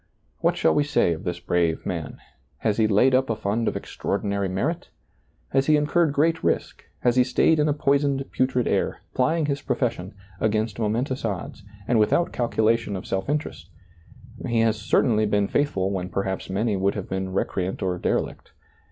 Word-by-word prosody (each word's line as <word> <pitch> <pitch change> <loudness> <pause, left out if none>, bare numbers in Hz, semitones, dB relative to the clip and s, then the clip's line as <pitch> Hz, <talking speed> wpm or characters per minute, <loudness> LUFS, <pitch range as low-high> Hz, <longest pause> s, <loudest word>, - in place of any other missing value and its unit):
What - - +1
shall 80 - +3
we 145 - +3
say 145 -12 +2
of 85 +6 -8
this 90 -1 -3
brave 85 -2 0
man; 80 -5 -4 0.4
has 105 -2 0
he 110 -1 +3
laid 110 +6 +4
up 130 0 +3
a 115 - +1
fund 105 +3 -1
of - - 0
extraordinary 100 0 -2
merit? 95 +1 -2 0.6
He - - -1
has 135 - 0
incurred 155 +2 +3
great 160 +3 +1
risk, - - -1 0.2
he 125 - +5
has 125 - +3
stayed 160 -1 +3
in 150 0 +3
a - - +3
poisoned, 140 -1 +1
putrid 130 -1 +1
air, - - 0
pl)'ing 155 +4 +1
his 140 -1 -1
profession, 115 -7 -2 0.2
against 110 0 0
momentous 120 +5 -1
odds, 100 -3 -4 0.3
and 120 -2 +3
without 170 +11 +2
calculation 115 -3 +1
of 95 - -6
self 95 +6 -2
interest; 120 - -3 0.8
he 115 -2 +2
has 115 -1 +3
certainly 110 0 +2
been 105 -1 +1
faithful 100 -10 0
when 90 -2 -3
per 100 +2 -1
haps 95 -1 -4
many 105 +3 0
would 95 +1 0
have 100 -3 -5
been 95 0 -3
recreant 95 0 -2
or 90 -1 -1
derelict. - - -2
110 Hz, 180 wpm, -24 LUFS, 95-135 Hz, 0.8 s, he